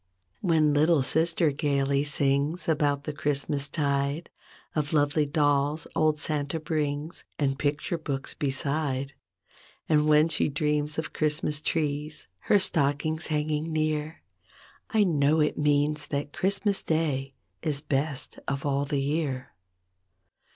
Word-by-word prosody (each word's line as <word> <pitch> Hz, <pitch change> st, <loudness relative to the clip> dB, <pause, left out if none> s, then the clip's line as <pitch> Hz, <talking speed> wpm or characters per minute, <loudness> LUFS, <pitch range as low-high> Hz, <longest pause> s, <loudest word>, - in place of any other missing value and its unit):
22 -, -, -4 dB, 0.2 s
When 150 Hz, -, +3 dB
little 155 Hz, 0 st, +4 dB
sister 160 Hz, +2 st, +2 dB
gaily 140 Hz, -1 st, +1 dB
sings 145 Hz, +3 st, 0 dB
About 145 Hz, -3 st, +1 dB
the 150 Hz, -, -4 dB
Christmas 145 Hz, 0 st, -1 dB
tide, 140 Hz, +1 st, -1 dB, 0.4 s
Of 150 Hz, -1 st, -1 dB
lovely 145 Hz, 0 st, +2 dB
dolls 145 Hz, +1 st, +1 dB
old 155 Hz, -1 st, +2 dB
Santa 150 Hz, +1 st, -1 dB
brings 155 Hz, 0 st, -3 dB
And 135 Hz, -1 st, 0 dB
picture 145 Hz, +4 st, -1 dB
books 140 Hz, -3 st, -3 dB
beside, 140 Hz, -1 st, -2 dB, 0.7 s
And 150 Hz, -1 st, +3 dB
when 155 Hz, +1 st, +5 dB
she 165 Hz, -, +1 dB
dreams 150 Hz, +1 st, -1 dB
of 160 Hz, -, -4 dB
Christmas 150 Hz, -1 st, 0 dB
trees. 150 Hz, -1 st, -2 dB, 0.2 s
Her -, -, +7 dB
stockings 155 Hz, -2 st, +1 dB
hanging 155 Hz, +1 st, -1 dB
near, 155 Hz, 0 st, -1 dB, 0.7 s
I 220 Hz, -3 st, +3 dB
know 155 Hz, -3 st, +2 dB
it 150 Hz, 0 st, +2 dB
means 150 Hz, 0 st, +1 dB
that 145 Hz, +1 st, -3 dB
Christmas 195 Hz, +1 st, 0 dB
day 140 Hz, -4 st, -1 dB, 0.3 s
Is 150 Hz, -3 st, -1 dB
best 140 Hz, -1 st, -2 dB
of 140 Hz, 0 st, -2 dB
all 140 Hz, 0 st, +1 dB
the 140 Hz, 0 st, -1 dB
year. 140 Hz, -2 st, -2 dB
150 Hz, 130 wpm, -27 LUFS, 140-155 Hz, 0.7 s, Her